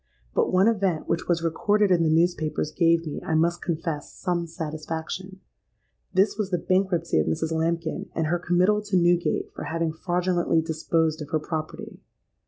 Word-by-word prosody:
But -, -, +1 dB
one 185 Hz, +3 st, +4 dB
event, 195 Hz, -8 st, +1 dB
which 165 Hz, 0 st, -1 dB
was 170 Hz, -1 st, +1 dB
recorded 205 Hz, +5 st, +2 dB
in 175 Hz, -2 st, +4 dB
the 160 Hz, -, +2 dB
newspapers, 155 Hz, -2 st, +1 dB
gave 165 Hz, 0 st, +3 dB
me, 150 Hz, -, -5 dB
I 160 Hz, -, -1 dB
must 170 Hz, +2 st, +2 dB
confess, 165 Hz, -3 st, -3 dB
some 175 Hz, -1 st, -2 dB
satisfaction: 160 Hz, +4 st, -5 dB, 0.7 s
this 195 Hz, +3 st, +2 dB
was 205 Hz, -3 st, -1 dB
the 180 Hz, -, +1 dB
bankruptcy 180 Hz, -, +1 dB
of 75 Hz, -, +1 dB
Mrs. 160 Hz, -, -1 dB
Lambkin 165 Hz, +3 st, -1 dB
and 160 Hz, -, 0 dB
her 175 Hz, +3 st, 0 dB
committal 180 Hz, +4 st, +2 dB
to 205 Hz, -2 st, 0 dB
Newgate 175 Hz, 0 st, +2 dB
for -, -, -6 dB
having 165 Hz, -1 st, -1 dB
fraudulently 175 Hz, 0 st, +1 dB
disposed 160 Hz, 0 st, 0 dB
of 150 Hz, -, -7 dB
her 155 Hz, -1 st, +1 dB
property. 155 Hz, 0 st, -6 dB
170 Hz, 170 wpm, -25 LUFS, 160-185 Hz, 0.7 s, one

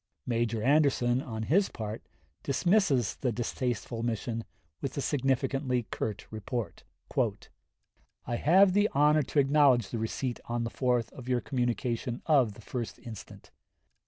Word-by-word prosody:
Major 115 Hz, -2 st, 0 dB
Anderson 135 Hz, -3 st, +3 dB
on 110 Hz, -4 st, -5 dB
his 190 Hz, -, +3 dB
part 110 Hz, -1 st, -5 dB, 0.4 s
dismisses 145 Hz, -, +2 dB
the 125 Hz, -, 0 dB
distasteful 120 Hz, 0 st, -3 dB
mission 115 Hz, 0 st, -2 dB, 0.4 s
with 135 Hz, 0 st, -4 dB
a -, -, +1 dB
significantly 135 Hz, -2 st, 0 dB
curt 105 Hz, -2 st, -3 dB
report: 110 Hz, +2 st, -4 dB, 1.4 s
"I 120 Hz, -, -2 dB
have 185 Hz, +7 st, +5 dB
the 205 Hz, +2 st, +3 dB
honor 150 Hz, +2 st, +4 dB
to 145 Hz, -, -5 dB
acknowledge 140 Hz, -5 st, +4 dB
the 115 Hz, -, -3 dB
receipt 120 Hz, +3 st, -3 dB
on 120 Hz, 0 st, -2 dB
the 115 Hz, -, -3 dB
4th 125 Hz, -3 st, 0 dB
of 125 Hz, -1 st, -9 dB
your 125 Hz, -1 st, +2 dB
communication 120 Hz, -1 st, -2 dB
of 130 Hz, -10 st, +3 dB
the 115 Hz, -, -13 dB
1st 120 Hz, +1 st, -5 dB
instant. 110 Hz, -3 st, -10 dB
125 Hz, 135 wpm, -29 LUFS, 115-140 Hz, 1.4 s, have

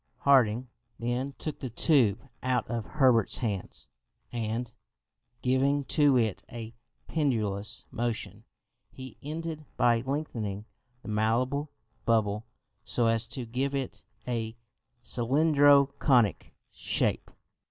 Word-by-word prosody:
Harding 130 Hz, -3 st, +4 dB, 0.3 s
then 120 Hz, +4 st, -2 dB
took 155 Hz, -, -5 dB
the 130 Hz, -, -4 dB
tube 120 Hz, -, +3 dB
out 130 Hz, -1 st, 0 dB
of 115 Hz, -3 st, -3 dB
Herbert's 130 Hz, -8 st, +3 dB
hands, 105 Hz, -6 st, -3 dB, 0.4 s
and, 115 Hz, 0 st, -3 dB, 0.7 s
giving 135 Hz, +3 st, +2 dB
to 145 Hz, -1 st, +4 dB
it 110 Hz, -5 st, 0 dB
a 115 Hz, -1 st, -7 dB, 0.3 s
pendulous 110 Hz, -10 st, -1 dB
motion, 120 Hz, -1 st, -3 dB, 0.5 s
he 130 Hz, 0 st, -11 dB
ended 155 Hz, +1 st, -5 dB
by 120 Hz, -1 st, +4 dB
lengthening 115 Hz, -7 st, -3 dB, 0.4 s
the -, -, -11 dB
malleable 125 Hz, +7 st, +1 dB, 0.3 s
bubble 110 Hz, -1 st, +1 dB, 0.4 s
so 120 Hz, -, 0 dB
as 115 Hz, 0 st, +2 dB
to 125 Hz, +1 st, -4 dB
give 130 Hz, +4 st, -2 dB
it 125 Hz, -6 st, -4 dB, 0.2 s
a 115 Hz, -2 st, -3 dB, 0.5 s
cylindro 140 Hz, +3 st, +4 dB
conic 120 Hz, -, +2 dB, 0.2 s
shape. -, -, -1 dB
120 Hz, 110 wpm, -29 LUFS, 115-140 Hz, 0.7 s, Harding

